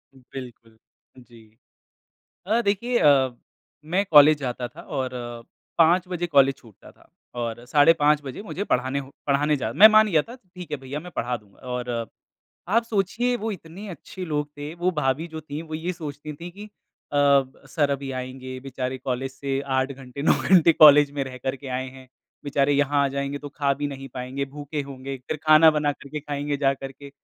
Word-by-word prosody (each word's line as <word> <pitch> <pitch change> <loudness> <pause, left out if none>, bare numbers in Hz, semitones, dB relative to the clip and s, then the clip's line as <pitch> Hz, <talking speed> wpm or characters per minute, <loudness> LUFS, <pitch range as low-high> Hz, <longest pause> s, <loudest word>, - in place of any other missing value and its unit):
बिल्कुल, 125 -3 -11 0.4
जी। 115 -3 -18 0.9
अ, 225 +3 +2
देखिए 235 +5 0
अ, 135 -4 +4 0.5
मैं 180 +5 0
कॉलेज 150 0 +8
जाता 125 -2 -4
था 165 - -13
और 130 -6 -3 0.7
5 170 +2 +5
बजे 175 -1 -2
कॉलेज 140 -4 +4
छूटता 110 -5 -17
था - - -25 0.3
और 120 -1 -4
साढ़े 145 +4 +6
5 150 0 +4
बजे 135 +9 -7
मुझे 200 -1 -4
पढ़ाने 130 -3 0
हो 135 0 -7 0.2
पढ़ाने 145 +1 +2
जा - - -3
मैं 215 +3 +9
मान 215 0 +5
गया 160 -6 +3
था, 235 - -11
ठीक 180 -6 -12
है, - - -1
भईया 135 +2 -6
मैं 180 +2 -10
पढ़ा 125 +1 -1
दूँगा। 105 -3 -20
और 125 0 -3 0.8
आप 230 +4 +3
सोचिए 230 +3 0
वो 225 -1 -3
इतने 185 +3 -10
अच्छे 185 +2 -8
लोग 150 -3 -2
थे, 145 +1 -6
वो 175 +2 0
भाभी 150 0 -1
जो 160 -1 -7
थी 150 0 -7
वो 160 -1 -8
ये 170 +3 -3
सोचती 150 -2 -7
थी 170 +4 -9
कि 205 +4 -11 0.4
अ, 140 -1 +4 0.3
सर 145 -3 +1
अभी 140 -1 -3
आएँगे, 130 0 -6
बेचारे 130 -1 -4
कॉलेज 130 +1 -3
से 135 0 -3
8 130 +1 +1
घंटे, 135 0 -9
9 - - +5 0.2
घंटे 170 -3 +6
कॉलेज 150 -2 +7
में - - +1
रह 130 -1 -8
कर 130 +2 -3
के 140 - -12
आएँ 130 +1 -3
हैं, 130 -1 -14 0.4
बेचारे 140 0 +1
यहाँ 145 0 +2
आ - - +1
जाएँगे 140 +1 -3
तो 145 0 -8
खा 140 0 0
भी 145 +2 -3
नहीं 135 -1 -7
पाएँगे, 130 +2 -4
भूखे 145 +2 -6
होंगे, 135 0 -7
फिर - - -1
खाना 155 +1 +7
बना 150 -1 0
कर 140 - -14
के 150 +1 -5
खाएँगे 145 0 -3
जा 135 -1 +2
करके। 135 +1 -10
145 Hz, 195 wpm, -24 LUFS, 130-160 Hz, 0.9 s, मैं